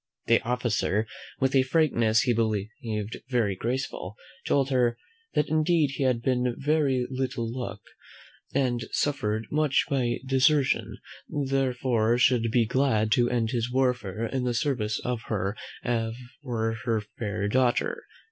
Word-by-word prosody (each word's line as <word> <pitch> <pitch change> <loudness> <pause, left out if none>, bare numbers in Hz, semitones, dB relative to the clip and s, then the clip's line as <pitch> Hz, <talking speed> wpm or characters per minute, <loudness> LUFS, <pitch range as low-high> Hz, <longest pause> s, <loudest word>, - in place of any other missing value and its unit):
The - - +4
officer, 115 -3 0 0.3
with 135 0 +1
a 135 - +6
frankness 125 -6 +3
he 125 -1 +2
believed 110 -1 -2
very 115 -6 +1
graceful, 115 -3 -3 0.3
told 140 -1 +2
her, 120 -2 +2 0.4
"That 150 - +2
indeed 155 -2 +2
he 140 - -5
had 125 -3 +1
but 125 -1 +1
very 140 -4 +1
little 130 -2 -2
luck, 115 -4 -5 0.7
and 125 -3 +1
had - - -7
suffered 110 -6 0
much 150 -2 +2
by 125 -4 +1
desertion, 135 +1 +2 0.3
therefore 130 -4 +1
should 120 -2 +3
be 115 0 +3
glad 110 -3 +1
to 120 +2 +4
end 115 -2 0
his 120 0 -1
warfare 120 -5 0
in 130 +2 -2
the 125 -1 0
service 115 -6 0
of 125 -2 -1
her 100 -1 -1 0.9
or 115 -4 -2
her 115 -3 +1 0.2
fair 105 -2 -2
daughter. 130 - +1
125 Hz, 140 wpm, -27 LUFS, 115-135 Hz, 0.9 s, a